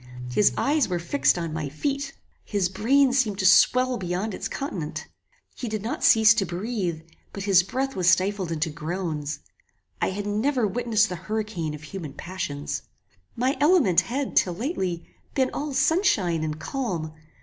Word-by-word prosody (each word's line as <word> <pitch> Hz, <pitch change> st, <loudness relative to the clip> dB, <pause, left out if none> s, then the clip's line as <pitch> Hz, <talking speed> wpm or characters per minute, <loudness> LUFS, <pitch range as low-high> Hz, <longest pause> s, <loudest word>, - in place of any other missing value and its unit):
His 205 Hz, +10 st, +4 dB
eyes 295 Hz, 0 st, +2 dB
were 180 Hz, -, 0 dB
fixed 140 Hz, -3 st, +1 dB
on 165 Hz, -2 st, -3 dB
my 155 Hz, -3 st, -3 dB
feet. 280 Hz, -, -3 dB, 0.3 s
His 200 Hz, -4 st, 0 dB
brain 250 Hz, +7 st, +3 dB
seemed 230 Hz, -7 st, +1 dB
to 190 Hz, -, -1 dB
swell 250 Hz, +7 st, +5 dB
beyond 185 Hz, +3 st, -2 dB
its -, -, -4 dB
continent. 180 Hz, -, -5 dB, 0.5 s
He 245 Hz, -, -5 dB
did 215 Hz, -1 st, -3 dB
not 230 Hz, -, -3 dB
cease 220 Hz, -1 st, +7 dB
to 210 Hz, -, +1 dB
breathe, 180 Hz, -3 st, -3 dB, 0.3 s
but 200 Hz, -, -5 dB
his 195 Hz, -3 st, +5 dB
breath 265 Hz, +8 st, -3 dB
was 180 Hz, -2 st, +3 dB
stifled 185 Hz, 0 st, +1 dB
into 160 Hz, 0 st, -1 dB
groans. 155 Hz, -2 st, -4 dB, 0.6 s
I -, -, +2 dB
had 200 Hz, +2 st, -4 dB
never 230 Hz, +4 st, +1 dB
witnessed 220 Hz, 0 st, +1 dB
the 180 Hz, -, -4 dB
hurricane 210 Hz, -8 st, -2 dB
of 150 Hz, -, -12 dB
human 155 Hz, -3 st, -7 dB
passions. 150 Hz, -5 st, -4 dB, 0.5 s
My 255 Hz, +4 st, +1 dB
element 295 Hz, -, +5 dB
had, 270 Hz, +3 st, -3 dB
till 180 Hz, -2 st, +3 dB
lately, 185 Hz, -, -3 dB, 0.3 s
been 260 Hz, -2 st, +2 dB
all 295 Hz, +1 st, -3 dB
sunshine 260 Hz, -, +2 dB
and 155 Hz, 0 st, -3 dB
calm. 175 Hz, -, -3 dB
195 Hz, 160 wpm, -25 LUFS, 170-245 Hz, 0.6 s, cease